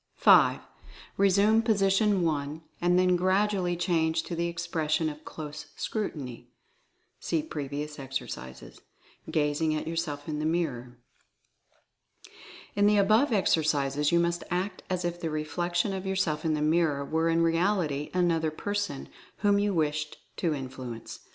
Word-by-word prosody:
5. -, -, +6 dB, 0.6 s
Resume 200 Hz, +3 st, +4 dB
position 200 Hz, -3 st, +2 dB
1, 150 Hz, -1 st, -2 dB, 0.2 s
and 175 Hz, +1 st, +3 dB
then 180 Hz, 0 st, +4 dB
gradually 185 Hz, 0 st, +1 dB
change 165 Hz, -2 st, +1 dB
to 170 Hz, -, -5 dB
the 170 Hz, +1 st, 0 dB
expression 165 Hz, -2 st, -1 dB
of 150 Hz, 0 st, -10 dB
Close 150 Hz, -1 st, -8 dB
Scrutiny 145 Hz, -, -4 dB, 0.7 s
(see 160 Hz, -2 st, -1 dB
previous 150 Hz, 0 st, -5 dB
ex 135 Hz, 0 st, -2 dB
ercises), 65 Hz, -, -9 dB, 0.5 s
gazing 155 Hz, +1 st, +1 dB
at 155 Hz, -, -3 dB
yourself 160 Hz, -3 st, -3 dB
in 150 Hz, -1 st, -3 dB
the 155 Hz, -, -2 dB
mirror. 125 Hz, -8 st, -2 dB, 1.8 s
In 205 Hz, 0 st, +4 dB
the 210 Hz, 0 st, +4 dB
above 215 Hz, +7 st, +4 dB
exercises 150 Hz, -7 st, +2 dB
you 170 Hz, -, +4 dB
must 170 Hz, 0 st, 0 dB
act 185 Hz, +2 st, -2 dB
as 185 Hz, -1 st, -1 dB
if 175 Hz, 0 st, -3 dB
the 165 Hz, -, -1 dB
reflec 160 Hz, +3 st, -3 dB
tion 185 Hz, +3 st, +2 dB
of 190 Hz, 0 st, -4 dB
yourself 165 Hz, -6 st, 0 dB
in 155 Hz, -1 st, +2 dB
the 150 Hz, -, -1 dB
mirror 155 Hz, -3 st, +2 dB
were 160 Hz, +3 st, +1 dB
in 165 Hz, 0 st, +3 dB
reality 165 Hz, -4 st, +1 dB
an 175 Hz, -1 st, +3 dB
other 160 Hz, -1 st, +1 dB
person 205 Hz, -2 st, -3 dB, 0.3 s
whom 205 Hz, -1 st, +4 dB
you 205 Hz, 0 st, +1 dB
wished 150 Hz, -3 st, -1 dB, 0.2 s
to 170 Hz, -, 0 dB
influence. 130 Hz, -4 st, -7 dB
165 Hz, 145 wpm, -28 LUFS, 150-185 Hz, 1.8 s, 5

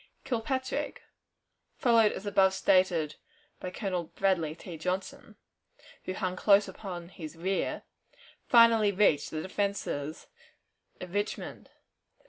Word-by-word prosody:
Kilpatrick, 260 Hz, +1 st, -2 dB, 0.7 s
followed 230 Hz, -3 st, +4 dB
as 190 Hz, -, -7 dB
above 195 Hz, -2 st, +3 dB
stated 180 Hz, -6 st, +2 dB, 0.4 s
by 185 Hz, -, -5 dB
Colonel 180 Hz, -2 st, -3 dB
Bradley 170 Hz, -4 st, 0 dB
T. 170 Hz, 0 st, -9 dB
Johnson, 180 Hz, +4 st, -4 dB, 0.7 s
who 185 Hz, -, -3 dB
hung 185 Hz, -2 st, -2 dB
close 200 Hz, +1 st, +4 dB
upon 175 Hz, -4 st, -7 dB
his 165 Hz, -3 st, -9 dB
rear, 185 Hz, +3 st, -2 dB, 0.6 s
finally 230 Hz, -3 st, +6 dB
reached 185 Hz, -7 st, +3 dB
the 155 Hz, 0 st, -4 dB
defenses 185 Hz, -6 st, -3 dB, 0.7 s
of 180 Hz, -1 st, -8 dB
Richmond. 205 Hz, +1 st, -4 dB
190 Hz, 105 wpm, -29 LUFS, 175-205 Hz, 0.7 s, finally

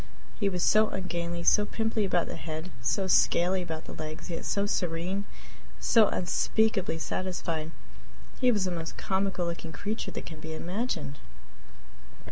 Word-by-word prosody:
He 200 Hz, -3 st, +3 dB
was 180 Hz, -2 st, -1 dB
so 215 Hz, 0 st, +5 dB
ungainly, 170 Hz, -2 st, -3 dB
so 210 Hz, -, +6 dB
pimply 220 Hz, 0 st, 0 dB
about 175 Hz, -3 st, +2 dB
the -, -, -5 dB
head, 160 Hz, +2 st, -5 dB
so 190 Hz, +11 st, +1 dB
scaly 185 Hz, 0 st, +4 dB
about 160 Hz, -3 st, -5 dB
the -, -, -8 dB
legs, 155 Hz, +2 st, -6 dB
yet 165 Hz, -, -4 dB
so 200 Hz, 0 st, +1 dB
serene, 180 Hz, +1 st, -1 dB, 0.5 s
so 225 Hz, -3 st, +6 dB
unspeakably 195 Hz, 0 st, +1 dB
satisfied! 165 Hz, -2 st, -2 dB, 0.7 s
He 250 Hz, -2 st, +5 dB
was 205 Hz, -5 st, +1 dB
the 185 Hz, -, -1 dB
most 165 Hz, -2 st, -4 dB
comical 190 Hz, -2 st, 0 dB
looking 170 Hz, -1 st, -4 dB
creature 205 Hz, +9 st, -3 dB
that -, -, -6 dB
can 160 Hz, -2 st, -8 dB
be 160 Hz, 0 st, -6 dB
imagined. 170 Hz, -, -3 dB
180 Hz, 150 wpm, -29 LUFS, 165-200 Hz, 0.7 s, so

